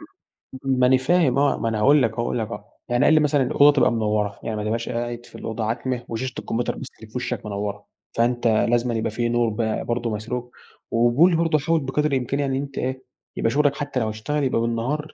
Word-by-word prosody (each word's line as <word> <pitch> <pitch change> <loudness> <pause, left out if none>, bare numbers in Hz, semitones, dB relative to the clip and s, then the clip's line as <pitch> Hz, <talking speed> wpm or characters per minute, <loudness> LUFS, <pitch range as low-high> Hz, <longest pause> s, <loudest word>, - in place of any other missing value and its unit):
م - - -12 0.7
ما 125 - +5
أنا 130 +1 +5
فاهم 135 0 +2
آه. 145 0 +2
ما 115 - 0
أنا 110 -1 -2
هاقول 140 +6 +5
لك 115 - +2
أهو 115 - -8
هاقول 120 +1 -1
لك 110 - -2
آه - - -8 0.2
يعني 120 0 +2
قال 155 - +5
لي 155 - +6
مثلًا: 145 -2 +2
"الأوضة 145 +3 +5
تبقى 135 - +4
منوّرة. 105 -3 -1
يعني 110 - -3
ما 105 - -3
تبقاش 115 +2 -2
قاعد 120 0 -4
في - - -17
الأوضة 110 0 -4
عتمة 120 +2 -2
وشاشة 125 +3 -3
الكمبيوتر 120 +2 -2
بس 135 - -7
الي 110 - -11
في - - -24
وِشَّك 125 -3 -3
منوّرة. 105 0 -4 0.3
فأنت 120 +1 +2
لازمًا 120 +2 +2
يبقى 110 -1 -1
في 120 +2 -1
نور 120 -1 +2
ب 110 0 -2
برضه 120 0 -1
مسروج، 120 +3 -4 0.4
وبيقول 120 +10 +4
برضه 165 -1 +2
حاول 165 +3 +1
بقدر 150 +3 0
الإمكان 135 +1 -1
إن 140 -2 0
أنت 140 0 -4
إيه، 130 +1 -3 0.3
يبقى - - +1
شُغلك 145 0 +2
حتّى 145 -3 -3
لو 110 -2 -1
أشتغل 140 +8 -2
يبقى 125 -3 +1
بالنهار 125 +7 -2
120 Hz, 225 wpm, -23 LUFS, 115-140 Hz, 0.7 s, لي